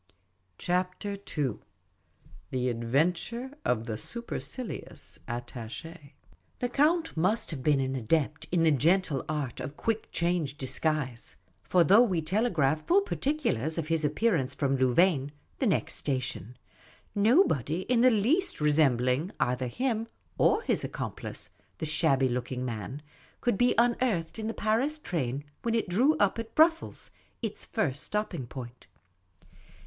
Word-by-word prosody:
CHAPTER 180 Hz, +3 st, -1 dB, 0.2 s
II 130 Hz, -8 st, 0 dB, 0.9 s
THE 125 Hz, -1 st, 0 dB
ADVENTURE 165 Hz, -, 0 dB
OF 115 Hz, -2 st, 0 dB
THE 110 Hz, -2 st, -4 dB
SUPERCILIOUS 235 Hz, -, -6 dB
ATTACH:^ 120 Hz, +6 st, -7 dB, 0.4 s
THE 245 Hz, -, -2 dB
Count 320 Hz, +6 st, +2 dB
must 185 Hz, +7 st, +1 dB
have 145 Hz, -5 st, -5 dB
been 145 Hz, +1 st, +3 dB
an 135 Hz, 0 st, -1 dB
adept 145 Hz, +5 st, 0 dB
in 175 Hz, -2 st, +3 dB
the 160 Hz, -, +5 dB
gentle 155 Hz, 0 st, +2 dB
art 145 Hz, -5 st, -3 dB
of 145 Hz, -, -6 dB
quick 225 Hz, -1 st, -2 dB
change 170 Hz, -5 st, 0 dB
disguise; 135 Hz, -3 st, -1 dB, 0.3 s
for 180 Hz, -2 st, +3 dB
though 200 Hz, +8 st, +7 dB
we 190 Hz, -9 st, +2 dB
telegraphed 160 Hz, -, +1 dB
full 385 Hz, +4 st, +5 dB
particulars 265 Hz, -, -1 dB
of 160 Hz, -1 st, -2 dB
his 165 Hz, -1 st, +1 dB
appearance 150 Hz, -, +1 dB
from 135 Hz, -2 st, +1 dB
Louvain, 135 Hz, +3 st, +3 dB, 0.3 s
the -, -, +2 dB
next -, -, +1 dB
station, 130 Hz, -3 st, -3 dB, 0.6 s
nobody 205 Hz, -, +3 dB
in 235 Hz, +4 st, +2 dB
the 255 Hz, -, +7 dB
least 270 Hz, -, +1 dB
resembling 145 Hz, 0 st, +2 dB
either 125 Hz, +1 st, 0 dB
him 230 Hz, -, -1 dB, 0.3 s
or 430 Hz, +3 st, +3 dB
his -, -, 0 dB
accomplice, -, -, -5 dB, 0.3 s
the 160 Hz, -, -3 dB
shabby 145 Hz, -4 st, +3 dB
looking 125 Hz, +1 st, -3 dB
man, 120 Hz, +4 st, -5 dB, 0.4 s
could 240 Hz, -4 st, +1 dB
be 245 Hz, +5 st, +3 dB
unearthed 235 Hz, -7 st, +1 dB
in 220 Hz, -, -3 dB
the 225 Hz, -, -3 dB
Paris 235 Hz, +8 st, +1 dB
train 145 Hz, -, -2 dB, 0.2 s
when 230 Hz, -1 st, 0 dB
it 230 Hz, -, 0 dB
drew 255 Hz, -, +3 dB
up 205 Hz, +2 st, +2 dB
at 230 Hz, 0 st, -6 dB
Brussels, 325 Hz, +1 st, +3 dB, 0.3 s
its 220 Hz, -2 st, -3 dB
first 145 Hz, -, -1 dB
stop 210 Hz, 0 st, -2 dB
ping 140 Hz, -9 st, -5 dB
place. 120 Hz, -1 st, -7 dB
165 Hz, 140 wpm, -29 LUFS, 135-225 Hz, 0.9 s, though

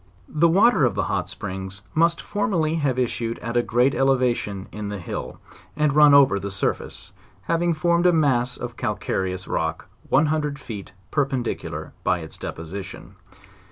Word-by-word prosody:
The 160 Hz, +2 st, +3 dB
water 195 Hz, -, +4 dB
of 125 Hz, -, +2 dB
the -, -, 0 dB
hot -, -, -2 dB
springs 95 Hz, 0 st, -6 dB
must 170 Hz, +1 st, +2 dB
formerly 195 Hz, -7 st, 0 dB
have 145 Hz, -6 st, 0 dB
issued 115 Hz, -2 st, -1 dB
at 115 Hz, +1 st, -5 dB
a 120 Hz, -, +4 dB
greater 125 Hz, +3 st, +2 dB
elevation 125 Hz, -7 st, +1 dB
in 105 Hz, -1 st, -5 dB
the 105 Hz, -, -4 dB
hill, 90 Hz, -, -6 dB, 0.4 s
and 150 Hz, -2 st, +2 dB
run 150 Hz, -1 st, +7 dB
over 135 Hz, -8 st, +6 dB
the 100 Hz, -, -4 dB
surface, 100 Hz, -, -3 dB, 0.3 s
having 170 Hz, 0 st, +1 dB
formed 170 Hz, +2 st, +2 dB
a -, -, +6 dB
mass 130 Hz, -6 st, +2 dB
of 120 Hz, 0 st, -6 dB
calcareous 95 Hz, -5 st, -2 dB
rock -, -, -2 dB, 0.2 s
one 150 Hz, +4 st, +4 dB
hundred 150 Hz, -2 st, -1 dB
feet 105 Hz, -9 st, -8 dB, 0.2 s
perpendicular 135 Hz, -5 st, -2 dB
by -, -, +2 dB
its 80 Hz, -, -9 dB
deposition. 85 Hz, +4 st, -7 dB
130 Hz, 160 wpm, -23 LUFS, 105-155 Hz, 0.4 s, run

